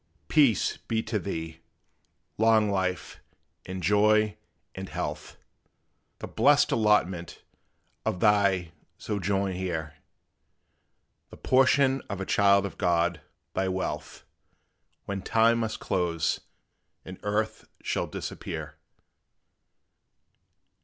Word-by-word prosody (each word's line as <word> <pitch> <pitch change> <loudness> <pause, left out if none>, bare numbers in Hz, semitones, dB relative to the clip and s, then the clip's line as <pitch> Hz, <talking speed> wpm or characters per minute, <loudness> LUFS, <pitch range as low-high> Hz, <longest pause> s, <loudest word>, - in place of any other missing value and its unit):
Peace 140 - +3
be 110 -1 -2
to 110 -2 -2
thee 80 -3 -5 0.8
long 110 -2 +4
life, 95 -2 -2 0.5
and 95 -1 -5
joy, 105 +3 +3 0.4
and - - -7
health - - -5 0.8
The - - -7
blest - - +4
allotment 100 -6 +1 0.6
of 90 - -2
thy 100 -5 +3 0.3
sojourn 100 -1 -1
here; 80 -5 -4 1.3
The - - -13
portion 135 +1 +3
of 100 -2 -4
a 95 - -3
child 100 0 +4
of 100 - -7
God, 85 -2 +1 0.3
thy 95 0 0
wealth, 95 0 -4 0.8
When 100 -1 -4
time 115 +3 +3
must 110 -1 -2
close, 85 -4 0 0.7
and 95 0 -9
earth 105 +2 -2 0.2
shall - - -1
disappear! - - -6
100 Hz, 100 wpm, -27 LUFS, 90-110 Hz, 1.3 s, long